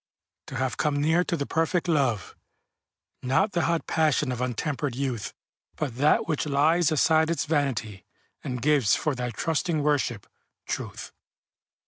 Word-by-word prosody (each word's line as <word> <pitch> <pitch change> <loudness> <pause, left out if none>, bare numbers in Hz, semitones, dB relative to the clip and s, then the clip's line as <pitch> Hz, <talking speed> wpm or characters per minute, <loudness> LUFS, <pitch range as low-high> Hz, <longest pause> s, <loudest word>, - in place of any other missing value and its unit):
To - - -7
have 130 -1 -1
come 150 -2 0
near 160 +4 +3
to 175 - -2
the 140 - -2
perfect 165 +3 0
love, 130 - 0 0.9
Not 135 +11 +1
the 170 -3 0
hot 170 -1 0
passion 150 -3 +1
of 125 -1 -4
untempered 130 +2 -2
youth, 125 -5 -3 0.4
But 135 -6 -4
that 145 +4 +3
which 155 -1 -1
lies 155 +4 +3
aside 160 +1 +3
its 165 -3 0
vanity, 130 - -1 0.4
And 125 -2 -4
gives, 140 -7 +4
for 155 - -1
thy 125 -1 -3
trusting 155 - -1
worship, 140 -8 0 0.4
truth. - - -5
145 Hz, 145 wpm, -26 LUFS, 125-160 Hz, 0.9 s, gives